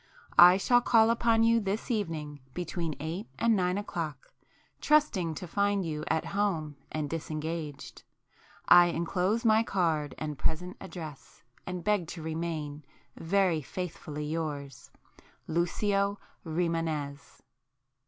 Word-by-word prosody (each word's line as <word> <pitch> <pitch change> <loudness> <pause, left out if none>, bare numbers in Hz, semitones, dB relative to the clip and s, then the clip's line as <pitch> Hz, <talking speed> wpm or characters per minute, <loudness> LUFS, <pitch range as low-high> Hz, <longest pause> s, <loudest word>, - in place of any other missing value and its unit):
I 180 +1 +10
shall 245 +5 +4
call 225 -1 +5
upon 230 -1 +3
you 230 0 +4
this 205 +4 -2
evening 160 -9 -3 0.2
between 170 -3 -3
eight 165 +8 -5
and 230 -1 +3
nine 180 -1 +1
o'clock, 165 -7 -5 0.5
trusting 210 - +2
to 180 - -6
find 200 +1 +1
you 155 -2 -3
at 160 - 0
home 170 -8 0 0.2
and 155 -1 -2
disengaged. 155 -1 -5 0.7
I 175 0 +8
enclose 180 +7 0
my 220 0 +5
card, 165 -9 0
and 150 -2 -5
present 180 +3 -2
address, 155 -6 -9 0.2
and 180 -1 -4
beg 205 -5 +1
to 165 0 -7
remain, 160 -2 -4 0.3
Very 180 -2 +1
faithfully 150 -1 -5
yours 150 -4 -4 0.6
Lucio 200 +4 0 0.3
Rimânez. 160 -4 -3
170 Hz, 120 wpm, -29 LUFS, 155-200 Hz, 0.7 s, I